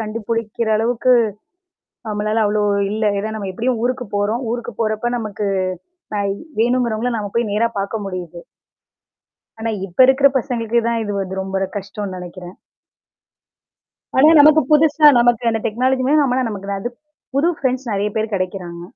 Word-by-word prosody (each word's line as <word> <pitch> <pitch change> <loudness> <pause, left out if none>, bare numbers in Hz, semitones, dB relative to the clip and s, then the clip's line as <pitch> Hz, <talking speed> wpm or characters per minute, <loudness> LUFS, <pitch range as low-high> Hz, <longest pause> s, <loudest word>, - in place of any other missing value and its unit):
கண்டுபுடிக்கிற 225 +1 -3
அளவுக்கு, 235 +3 +2 1.0
நம்மளால 215 +1 0
அவ்வளோ 210 0 +1 0.3
இல்ல. 215 +1 -2
ஏன்னா 215 +2 -3
நம்ம 200 -3 -4
எப்படியும் 235 +4 -1
ஊருக்கு 250 +1 -1
போறோம். 210 +5 0
ஊருக்கு 240 -1 -5
போறப்ப, 225 +2 -1
நமக்கு 210 -2 -4 0.7
நான் 200 -1 0 0.3
வேணுங்கிறவங்கள 240 0 +1
நாம 205 -2 -4
போய் 235 -2 +1
நேரா 230 +3 +2
பார்க்க 205 +2 -3
முடியுது. 180 -3 -6 1.2
ஆனா 225 0 -1 0.2
இப்ப 180 - -19
இருக்கற 265 +1 +4
பசங்களுக்கதான் 235 -2 -1
இது 205 - -3
வந்து 190 0 -4
ரொம்ப 190 0 -6
ஒரு 195 - -1
கஷ்டம்ன்னு 200 -1 -6
நெனைக்கிறன். 180 0 -9 1.6
ஆனா 275 +4 +7
நமக்கு 305 +2 +7
புதுசா 305 0 +5
நமக்கு 240 -1 +3
அந்த 225 -1 -1
டெக்னாலஜியுமே 255 +4 +1
நம்மள 260 -1 +1
நமக்கு 200 -2 -7
தான், 195 0 -2
அது 240 - -3 0.4
புது 295 +6 +3
ஃப்ரெண்ட்ஸ் 260 -1 -1
நெறைய 205 +1 -1
பேர் 220 0 -1
கெடைக்கிறாங்க. 180 -2 -4
220 Hz, 140 wpm, -19 LUFS, 200-245 Hz, 1.6 s, ஆனா